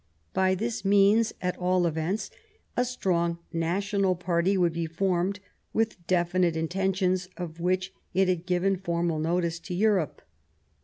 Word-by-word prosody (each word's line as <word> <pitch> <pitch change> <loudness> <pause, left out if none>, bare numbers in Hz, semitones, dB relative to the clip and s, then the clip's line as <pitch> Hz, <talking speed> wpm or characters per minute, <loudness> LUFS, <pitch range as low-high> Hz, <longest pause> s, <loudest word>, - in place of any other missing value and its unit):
By 190 0 +3
this 220 +2 -3
means, 205 +3 +4
at 180 0 -1
all 180 0 +2
events, 165 +5 -1 0.4
a 245 - +2
strong 175 -9 0 0.2
national 190 +3 +1
party 175 +2 +1
would 175 -3 +2
be 165 0 -2
formed, 185 +3 0 0.3
with 215 -6 -1
definite 175 -1 +2
in 160 0 0
tentions 185 -1 0
of 170 -2 -6
which 185 +2 0 0.2
it 190 +1 +3
had 180 -1 -1
given 185 +1 +2
formal 170 -3 -1
notice 170 +1 0
to 175 +1 -6
Europe. 195 -5 +1
180 Hz, 145 wpm, -27 LUFS, 170-195 Hz, 0.4 s, means